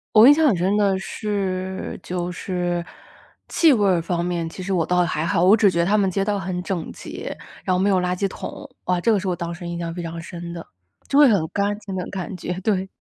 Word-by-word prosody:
我 220 +3 +9
印 285 - +10
象 315 +1 +3
很 210 -10 +3
深 190 +4 +1
的 200 -2 +3
是 190 -2 -3
就 180 0 -3
是 175 -1 -2 0.7
气 325 -3 +5
味 210 -6 +3
儿 180 -3 +3
方 170 +1 -1
面 170 -2 -2
其 185 - -8
实 195 +1 -2
我 170 -3 +2
倒 180 0 +2
也 - - +3
还 160 -2 -1
好。 170 0 +2
我 190 +4 +7
只 205 -2 +4
觉 170 -2 -1
得 170 - +3
他 210 +3 +3
们 195 -2 +2
街 195 +1 -1
道 205 -1 0
很 180 -1 -3
整 180 -4 -3
洁， - - -7 0.3
然 185 -2 +1
后 - - +1
没 195 +2 +2
有 190 -2 +3
垃 180 0 0
圾 195 - +1
桶。 280 - -8 0.2
啊， 180 -1 +1
这 230 - +2
个 210 - +3
是 190 - -4
我 180 - 0
当 170 -1 -4
时 175 0 -7
印 170 0 -4
象 170 -1 -4
非 175 - -5
常 165 0 -5
深 170 0 -7
的。 170 - -7 0.4
就 275 - +1
会 295 - +9
很 190 -8 +2
干 205 +1 0
净 200 -3 -7
的 180 - -3
感 190 0 -5
觉， 180 +1 -4
对。 190 -2 0
185 Hz, 280 characters per minute, -22 LUFS, 175-200 Hz, 0.7 s, 印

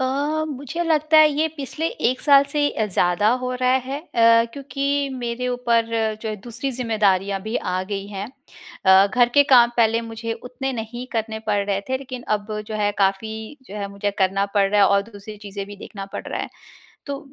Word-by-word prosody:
अ, 260 - +1 0.4
मुझे 285 +5 -4
लगता 310 -1 +3
है 310 0 +8
ये 305 +2 +1
पिछले 290 +3 -3 0.2
1 255 +1 0
साल 280 -2 +6
से 290 -1 +2
अ, 220 - -1
ज़्यादा 180 +1 +2
हो 255 0 -2
रहा 255 0 +2
है 275 +2 -4
अ, 230 -7 +4
क्योंकि 275 0 -4 0.3
मेरे 240 +1 -3
ऊपर 240 -2 +1 0.4
जो 220 - -3
है 215 - -2
दूसरी 250 +4 -3
ज़िम्मेदारियाँ 200 -4 +1
भी 220 +2 -2
आ 185 0 -2
गई 200 0 -3
हैं। 200 -1 -5 0.6
अ, 190 +1 +7
घर 240 +3 +3
के 285 - +9
काम 240 -1 +7
पहले 230 0 +3
मुझे 225 0 -4
उतने 250 +3 -5
नहीं 240 +3 -7
करने 220 -1 -2
पड़ 210 -1 +1
रहे 200 -1 0
थे, 260 0 0
लेकिन 255 -2 -8
अब 210 +1 -9 0.2
जो 215 - -5
है, 205 -1 +1
काफ़ी 220 +6 -1
जो 200 - -9
है, 200 -1 -4
मुझे 200 +1 -2
करना 195 +1 +2
पड़ 200 -1 +3
रहा 210 0 +3
है, 195 - +6
और 200 0 +3
दूसरी 205 +1 -10
चीज़ें 200 0 -5
भी 205 0 -10
देखना 195 -1 -8
पड़ - - -6
रहा - - -3
है। - - -4 0.6
तो 280 -1 -4
225 Hz, 205 wpm, -22 LUFS, 200-255 Hz, 0.6 s, के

